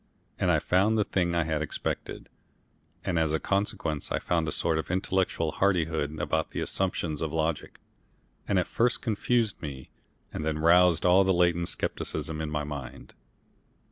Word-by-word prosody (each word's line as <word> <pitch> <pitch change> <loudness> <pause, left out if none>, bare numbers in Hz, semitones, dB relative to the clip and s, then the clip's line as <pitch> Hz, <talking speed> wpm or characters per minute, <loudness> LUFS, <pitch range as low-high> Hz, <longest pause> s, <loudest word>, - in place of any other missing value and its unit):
And - - +1
I - - +4
found 100 +5 +2
the 105 - +3
thing 90 -3 0
I 85 - +2
had 80 -1 -1
expected. 75 - -4 0.8
And 90 -3 +1
as 80 -1 +1
a 80 - +1
consequence 100 -7 -1
I - - +1
found 85 -2 0
a - - -1
sort 80 +1 +2
of - - -5
intellectual 90 -3 0
hardihood 80 -6 0
about 80 0 -1
the - - -5
assumptions 85 -5 -2
of 80 -2 -2
logic, 80 -1 -2 0.7
that 100 - +1
at 90 - +2
first 120 +2 0
confused 115 0 0
me 70 -4 -7 0.4
and - - -4
then 80 0 -1
roused 85 +1 +4
all 90 +2 +6
the 95 -1 +2
latent 85 -1 +2
scepticism 80 0 -3
in 80 - -3
my 75 0 -2
mind. 70 -4 -8
85 Hz, 170 wpm, -28 LUFS, 80-95 Hz, 0.8 s, all